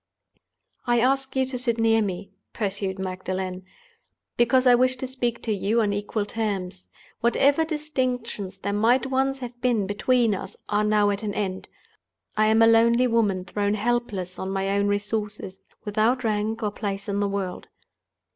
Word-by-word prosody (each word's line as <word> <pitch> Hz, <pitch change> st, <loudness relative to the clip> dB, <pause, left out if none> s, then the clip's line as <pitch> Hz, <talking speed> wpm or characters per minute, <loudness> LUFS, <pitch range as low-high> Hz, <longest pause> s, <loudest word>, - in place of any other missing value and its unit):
"I 240 Hz, 0 st, +3 dB
ask 270 Hz, +2 st, +1 dB
you 265 Hz, 0 st, +2 dB
to 255 Hz, -1 st, -4 dB
sit 235 Hz, -2 st, 0 dB
near 225 Hz, 0 st, +3 dB
me," 195 Hz, -1 st, -4 dB, 0.2 s
pursued 200 Hz, -2 st, -2 dB
Magdalen, 185 Hz, 0 st, -4 dB, 0.7 s
"because 245 Hz, +2 st, +3 dB
I 250 Hz, -, +7 dB
wish 255 Hz, +1 st, +3 dB
to 255 Hz, -, -5 dB
speak 250 Hz, -2 st, -3 dB
to 225 Hz, -, -1 dB
you 210 Hz, +3 st, +1 dB
on 210 Hz, -3 st, +1 dB
equal 205 Hz, +1 st, -2 dB
terms. 200 Hz, -4 st, -3 dB, 0.3 s
Whatever 280 Hz, +6 st, +3 dB
distinctions 255 Hz, -, -3 dB
there 200 Hz, +1 st, -3 dB
might 235 Hz, +6 st, +3 dB
once 270 Hz, +1 st, 0 dB
have 245 Hz, -2 st, -8 dB
been 235 Hz, -5 st, +2 dB
between 230 Hz, +3 st, +2 dB
us 190 Hz, -, -6 dB
are 210 Hz, 0 st, +2 dB
now 210 Hz, -1 st, +3 dB
at 200 Hz, -, -3 dB
an 210 Hz, -2 st, -3 dB
end. 190 Hz, -3 st, -3 dB, 0.7 s
I 215 Hz, 0 st, +3 dB
am 220 Hz, +1 st, +5 dB
a -, -, +7 dB
lonely 235 Hz, +2 st, +5 dB
woman 210 Hz, -6 st, +1 dB
thrown 205 Hz, +2 st, -1 dB
helpless 215 Hz, -5 st, -2 dB
on 190 Hz, -, -3 dB
my 195 Hz, 0 st, -1 dB
own 200 Hz, 0 st, +1 dB
resources, 205 Hz, -1 st, -3 dB, 0.2 s
without 220 Hz, +5 st, +1 dB
rank 220 Hz, +1 st, -1 dB
or 210 Hz, -, 0 dB
place 200 Hz, 0 st, -4 dB
in 200 Hz, 0 st, -1 dB
the 205 Hz, -1 st, +1 dB
world. 195 Hz, -2 st, -4 dB
215 Hz, 165 wpm, -25 LUFS, 200-240 Hz, 0.7 s, I